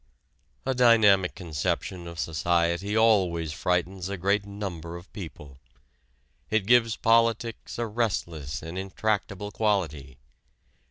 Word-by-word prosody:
A 135 Hz, -, +1 dB
dynamic 110 Hz, -7 st, +5 dB
conception 85 Hz, +1 st, -3 dB
of 85 Hz, 0 st, -9 dB
society 85 Hz, -, 0 dB
always 90 Hz, -8 st, +3 dB
frightens 90 Hz, +2 st, -1 dB
a 100 Hz, -, -3 dB
great 100 Hz, +3 st, +1 dB
number 90 Hz, -5 st, -6 dB
of 85 Hz, +3 st, -12 dB
people. 75 Hz, -8 st, -9 dB, 0.9 s
It 110 Hz, -3 st, +1 dB
gives 115 Hz, -1 st, +4 dB
politics 115 Hz, 0 st, +1 dB
a 120 Hz, -, -1 dB
restless 85 Hz, -, -2 dB
and 80 Hz, +3 st, -5 dB
intractable 100 Hz, +1 st, -2 dB
quality. 80 Hz, -, -1 dB
95 Hz, 110 wpm, -27 LUFS, 85-110 Hz, 0.9 s, dynamic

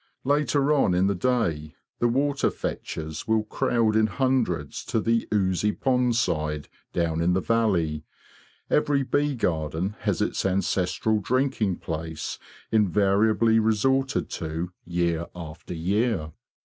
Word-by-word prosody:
Later 145 Hz, +1 st, +2 dB
on 135 Hz, -11 st, +3 dB
in 90 Hz, +2 st, +3 dB
the 100 Hz, -, +2 dB
day 85 Hz, -9 st, -1 dB, 0.2 s
the 120 Hz, -, +3 dB
water 140 Hz, +3 st, +1 dB
fetchers 80 Hz, -1 st, -5 dB
will 110 Hz, -1 st, +2 dB
crowd 110 Hz, 0 st, +1 dB
in 110 Hz, 0 st, +4 dB
hundreds 130 Hz, +5 st, -1 dB
to 115 Hz, -, 0 dB
the 115 Hz, +1 st, +1 dB
oozy 100 Hz, -1 st, +1 dB
pond 125 Hz, -3 st, +1 dB
side 75 Hz, -, -1 dB, 0.2 s
down 85 Hz, -2 st, 0 dB
in 90 Hz, +1 st, +2 dB
the 95 Hz, -, +2 dB
valley—every 110 Hz, -, -1 dB
bee 145 Hz, +1 st, 0 dB
garden 85 Hz, -1 st, -1 dB
has -, -, -1 dB
its -, -, -1 dB
ancestral 95 Hz, +3 st, +1 dB
drinking 115 Hz, -4 st, 0 dB
place 80 Hz, -1 st, -5 dB, 0.3 s
invariably 105 Hz, +2 st, +3 dB
resorted 130 Hz, +5 st, +1 dB
to 80 Hz, +2 st, -4 dB, 0.2 s
year 85 Hz, -1 st, 0 dB
after 80 Hz, 0 st, -8 dB
year. 95 Hz, -1 st, 0 dB
105 Hz, 125 wpm, -25 LUFS, 85-120 Hz, 0.3 s, in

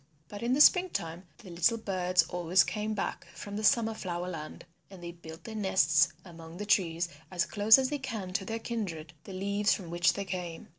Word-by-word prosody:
But 205 Hz, -, -8 dB
in 235 Hz, +2 st, 0 dB
the 285 Hz, -, +3 dB
spring 365 Hz, +4 st, +6 dB
time 170 Hz, -, -5 dB, 0.2 s
the 185 Hz, -, -11 dB
little 175 Hz, +7 st, +2 dB
birds 185 Hz, -4 st, +1 dB
always 175 Hz, +1 st, +2 dB
come 215 Hz, +1 st, -3 dB
back 200 Hz, -, -4 dB
from 205 Hz, 0 st, -7 dB
the 215 Hz, -, -4 dB
Summer 225 Hz, 0 st, +3 dB
Flower 180 Hz, -4 st, -4 dB
Land. 160 Hz, -4 st, -7 dB, 0.2 s
And 190 Hz, -3 st, -13 dB
they 170 Hz, -, -6 dB
build 165 Hz, -1 st, -12 dB
their 225 Hz, -, -8 dB
nests 170 Hz, -6 st, +3 dB, 0.2 s
among 165 Hz, -1 st, -11 dB
the 210 Hz, -, -5 dB
trees 175 Hz, -4 st, +1 dB, 0.2 s
as 175 Hz, -1 st, 0 dB
close 215 Hz, +2 st, +6 dB
as 260 Hz, -1 st, 0 dB
they 290 Hz, -, -2 dB
can 220 Hz, -8 st, -5 dB
to 195 Hz, -, -1 dB
their 225 Hz, +3 st, -4 dB
kindred, 185 Hz, -9 st, -5 dB
the 195 Hz, -, -9 dB
leaves 200 Hz, +2 st, +1 dB
from 175 Hz, -4 st, -9 dB
which 175 Hz, +1 st, +3 dB
they 200 Hz, -, -4 dB
came. 180 Hz, -3 st, -6 dB
190 Hz, 210 wpm, -30 LUFS, 170-215 Hz, 0.2 s, spring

